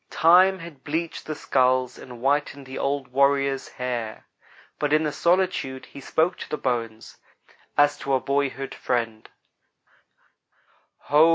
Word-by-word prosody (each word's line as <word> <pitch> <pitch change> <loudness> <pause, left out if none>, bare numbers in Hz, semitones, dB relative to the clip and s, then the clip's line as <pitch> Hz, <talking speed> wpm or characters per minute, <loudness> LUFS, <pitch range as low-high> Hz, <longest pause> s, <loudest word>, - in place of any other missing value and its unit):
Time 185 +4 +5
had 165 -6 -11
bleached 160 +2 -3
the 155 - -3
skulls 130 -2 +1
and 130 - -11
whitened 140 0 0
the 130 +1 -7
old 140 -2 -1
warrior's 140 +1 +2
hair, 120 -3 -4 0.5
but 150 -1 0
in 155 +1 +4
the 150 - 0
solitude 170 -5 0
he 140 - -12
spoke 165 +6 +1
to - - -7
the 150 - -2
bones 115 -4 -3 0.6
as 145 0 +4
to 140 -2 0
a - - +2
boyhood 135 -1 -1
friend: 115 -3 -2 1.7
"Ho! 150 +3 +5
140 Hz, 135 wpm, -25 LUFS, 130-155 Hz, 1.7 s, Time